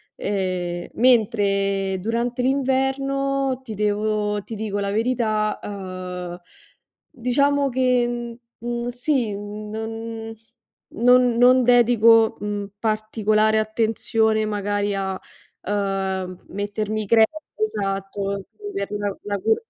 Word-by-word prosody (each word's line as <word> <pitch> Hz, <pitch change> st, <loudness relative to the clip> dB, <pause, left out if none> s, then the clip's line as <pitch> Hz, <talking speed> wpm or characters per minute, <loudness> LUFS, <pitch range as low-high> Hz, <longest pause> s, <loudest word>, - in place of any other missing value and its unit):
Ehm, 185 Hz, -3 st, -2 dB
mentre 200 Hz, -5 st, +2 dB
durante 235 Hz, +4 st, -1 dB
l'inverno, 270 Hz, 0 st, 0 dB
ti 225 Hz, -, -7 dB
devo 210 Hz, 0 st, 0 dB
ti 225 Hz, -, -9 dB
dico 210 Hz, -1 st, -3 dB
la 200 Hz, 0 st, -1 dB
verità, 215 Hz, -1 st, 0 dB
uhm, 185 Hz, -3 st, -6 dB, 0.7 s
diciamo 280 Hz, +3 st, +1 dB
che, 240 Hz, -2 st, 0 dB, 0.2 s
mhmm, 240 Hz, +1 st, -3 dB
sì, 245 Hz, -3 st, 0 dB
mhmm, 210 Hz, +1 st, -7 dB
non 225 Hz, 0 st, -5 dB, 0.6 s
non 245 Hz, +1 st, +5 dB
non 250 Hz, +1 st, +6 dB
dedico, 230 Hz, -2 st, +5 dB
mhmm, 205 Hz, 0 st, -3 dB
particolare 215 Hz, 0 st, +1 dB
attenzione 220 Hz, 0 st, +1 dB
magari 205 Hz, -1 st, -1 dB
a, 190 Hz, -1 st, -2 dB, 0.4 s
uhm, 190 Hz, -2 st, -2 dB
mettermi 205 Hz, +2 st, -3 dB
creme, 225 Hz, +1 st, +6 dB, 0.3 s
esatto, 195 Hz, -, -2 dB, 0.3 s
per 200 Hz, +1 st, -3 dB
la 205 Hz, -1 st, -2 dB
la 205 Hz, -1 st, -2 dB
cu 220 Hz, +3 st, +3 dB
215 Hz, 100 wpm, -23 LUFS, 200-240 Hz, 0.7 s, non